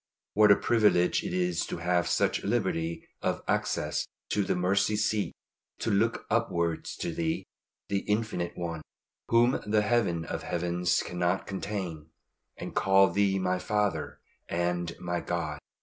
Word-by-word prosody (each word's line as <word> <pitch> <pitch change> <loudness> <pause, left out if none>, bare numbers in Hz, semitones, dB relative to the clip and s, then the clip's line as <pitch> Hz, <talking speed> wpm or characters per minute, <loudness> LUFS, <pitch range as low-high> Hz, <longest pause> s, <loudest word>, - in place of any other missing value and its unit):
What 105 0 +6
a 100 - +9
privilege 105 -7 +3
it - - -3
is 90 -2 0
to - - -4
have 85 +1 +1
such - - +1
liberty 85 -8 -1
of - - -1
access - - 0 0.2
to 105 - +1
the - - 0
Mercy 100 +4 +2
seat 105 0 0 0.5
to 115 - -1
look 110 +4 +1
upwards 85 -8 0
to - - -1
Thee, 80 0 -1 0.4
the 100 - 0
Infinite 105 -5 0
One, 85 -2 -3 0.5
whom 120 +2 +4
the 105 0 +2
Heaven 100 -8 +1
of - - -4
Heavens 85 0 0
cannot 90 +1 -1
contain, 95 -6 -4 0.5
and - - -6
call 95 -1 +4
Thee 100 +1 +2
my 90 -1 0
Father 105 +1 -1 0.3
and 85 0 -1
my 90 0 -2
God! 80 -4 -3
90 Hz, 145 wpm, -29 LUFS, 85-105 Hz, 0.5 s, a